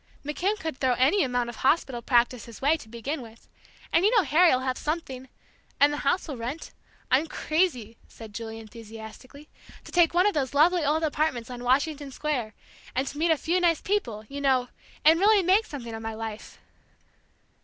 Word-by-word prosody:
McKim 365 +8 -1
could 320 -5 -4
throw 260 -2 +2
any 280 +11 +3
amount 245 -2 -1
of 240 -2 -8
hospital 265 -4 +1
practice 240 -1 +1
his 230 -2 -12
way, 290 +4 +3
to 220 -9 -11
begin 260 +6 -4
with. 230 -1 -14 0.5
And 335 - +4
you 410 - +5
know 415 - +5
Harry'll 320 -6 +4
have 260 -1 -1
something, 265 -5 -4 0.5
and 290 +1 +5
the - - -3
house 325 +7 0
will 285 -5 -5
rent. 250 +7 -6 0.4
I'm 275 +6 +3
crazy," 300 - -1
said 220 -2 -12
Julie, 225 0 -6
enthusiastically, 225 +5 -11 0.4
"to - - -12
take 345 -1 +3
one 360 +2 +4
of 415 - +3
those 280 -2 -2
lovely 335 +3 +4
old 305 +3 +1
apartments 290 -6 -1
on 245 0 -7
Washington 285 +3 0
Square, 255 -7 -3 0.4
and 265 +2 -1
meet 320 +4 0
a 320 - +4
few 340 +5 0
nice 335 -3 +3
people, 240 - -2
you 280 +3 -6
know, 260 -3 +2 0.4
and 320 +2 +6
really 410 0 +5
make 385 +5 +3
something 235 -6 -7
of 225 - -6
my 225 0 -5
life!" 220 -1 -7
275 Hz, 185 wpm, -26 LUFS, 240-320 Hz, 0.5 s, and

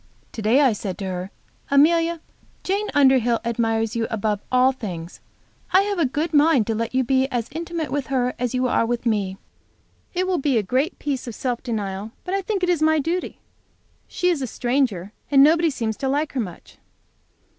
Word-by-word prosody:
To 225 - -6
day 225 +7 +4
I 265 -5 +4
said 195 -3 -5
to 200 - -5
her, 185 0 -4 0.4
Amelia, 330 +3 +3 0.4
Jane 400 +3 -1
Underhill 260 -4 +4
admires 225 -1 0
you 230 -1 0
above 210 -2 -1
all 255 +1 +5
things. 180 -9 -7 0.5
I 380 - +7
have 405 -2 -2
a 315 - +3
good 305 +6 -2
mind 290 -5 +4
to 225 - -1
let 230 +3 -3
you 260 - +3
be 265 +1 +2
as 240 -4 -3
intimate 330 0 -4
with 285 -2 -2
her 250 -2 0
as 250 0 -1
you 255 0 +1
are 245 - +2
with 240 +1 -2
me. 200 -4 0 0.8
It 365 +1 +1
will 370 -2 0
be 275 -3 +1
a 215 - +1
great 260 - 0
piece 270 -3 -3
of 235 - -6
self 245 -2 -2
denial, 210 -3 -4
but 365 - -4
I 395 - +1
think 390 0 -2
it 360 - +2
is 345 -3 +1
my 315 0 +4
duty. 335 +5 -2 0.7
She 360 - 0
is 335 -6 0
a 260 - -2
stranger, 240 -6 -1 0.2
and 275 -1 +6
nobody 325 +3 +4
seems 225 -6 -3
to 270 - -2
like 290 +3 -1
her 270 - -2
much. 190 -7 -7
260 Hz, 200 wpm, -22 LUFS, 225-310 Hz, 0.8 s, I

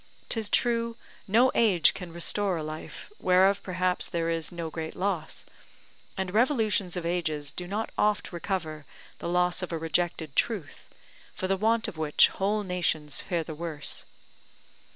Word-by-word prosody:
'Tis 220 -3 +2
true, 235 0 +1 0.3
no 235 +6 +5
age 190 -9 +4
can 180 -3 -7
restore 180 +2 0
a 160 - -3
life, 155 - -8
whereof 190 +2 +4
perhaps 185 -1 0
there 165 -1 -1
is 165 -2 -1
no 170 -2 -5
great 160 0 -5
loss; 180 -4 -2 0.7
and 190 -1 -2
revolutions 215 -6 +2
of 175 - -3
ages 155 -4 -1
do 180 +3 -6
not 210 +4 -3
oft 210 -3 +1
recover 165 -4 -3 0.4
the - - -4
loss 180 0 +3
of 180 - -4
a 165 - -1
rejected 160 -2 -1
truth, 195 -11 -1 0.5
for 185 - -2
the 195 - +2
want 225 +3 +2
of 160 - -7
which 150 -2 +5
whole 205 +2 0
nations 170 -6 -1
fare 175 -3 -1
the 160 - -7
worse. 155 -2 -4
180 Hz, 155 wpm, -28 LUFS, 165-200 Hz, 0.7 s, no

